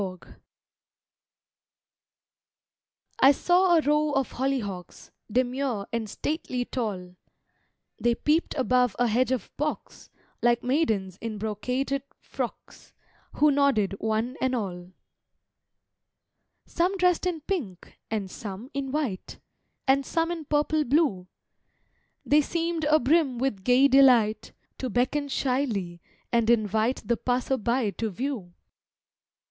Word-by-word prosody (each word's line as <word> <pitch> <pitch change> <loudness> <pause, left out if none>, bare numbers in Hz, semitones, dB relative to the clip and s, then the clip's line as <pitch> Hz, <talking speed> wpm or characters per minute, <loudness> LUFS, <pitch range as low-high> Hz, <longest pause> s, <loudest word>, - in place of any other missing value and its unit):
HOLLYHOCKS 185 -2 -6 2.9
I 270 - +8
saw 355 +4 +3
a - - +4
row 300 0 +1
of 270 -2 0
hollyhocks, 230 -9 -4 0.2
Demure 250 -3 0
and 225 -2 -2
stately 255 - -3
tall, 185 -8 -4 0.8
They 240 0 +2
peep'd 305 +7 0
above 250 -4 +2
a 245 - +2
hedge 245 +3 +1
of 255 -6 -3
box, 300 +2 -4 0.3
Like 240 0 +2
maidens 220 - 0
in 225 -1 -5
brocaded 250 +6 -2 0.2
frocks, - - -7 0.4
Who 300 0 +4
nodded 275 -9 +2
one 220 +4 -1
and 260 0 +1
all. 180 -5 -5 1.7
Some 360 +3 0
dress'd 360 -1 +2
in 335 -3 -2
pink, 275 - -5
and 205 -4 -3
some 215 +5 -8
in 275 -1 -3
white, 275 -10 -3 0.5
And 275 +1 +4
some 330 +5 -1
in 330 -3 -5
purple 300 +1 +1
blue, 255 - +1 1.0
They 295 +1 +5
seemed 335 +1 -2
abrim 300 -2 +3
with 235 -6 -2
gay 250 +4 +5
delight, 250 -6 +4 0.3
To 260 - -3
beckon 255 +6 0
shyly, 240 -11 -1 0.3
and 235 -2 +2
invite 220 +1 +1
The 235 0 +1
passer 250 +2 0
by 235 -1 0
to 225 +2 -3
view. 210 -5 -5
255 Hz, 115 wpm, -26 LUFS, 215-285 Hz, 2.9 s, I